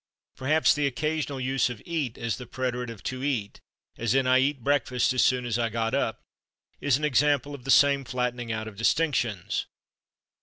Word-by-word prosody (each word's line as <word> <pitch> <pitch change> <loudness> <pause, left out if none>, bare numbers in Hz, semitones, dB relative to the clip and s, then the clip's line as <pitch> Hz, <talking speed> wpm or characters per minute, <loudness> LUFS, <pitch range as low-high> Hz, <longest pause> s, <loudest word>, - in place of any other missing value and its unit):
Perhaps 155 +4 +3
the 145 -1 +1
occasional 145 +1 -2
use 130 0 +1
of 120 - -6
/eat/ 155 -8 -3
as 115 -1 -2
the 125 - -9
preterite 125 -1 -3
of 115 -5 -10
/to 130 0 -4
eat/, 120 -8 -2 0.4
as 115 +1 +1
in 135 -1 +3
"I 130 0 +5
/eat/ 140 -1 0
breakfast 130 -1 +1
as 130 - +2
soon 125 -1 +2
as 120 -1 -1
I 115 -1 +1
got 115 +1 -2
up," 135 -5 -1 0.6
is 145 -3 +2
an 150 - -8
example 145 0 +2
of 135 -3 -10
the - - -6
same 140 0 +5
flattening 125 -2 -3
out 110 0 -3
of 105 -2 -10
distinctions. 115 - 0
130 Hz, 190 wpm, -27 LUFS, 120-140 Hz, 0.6 s, I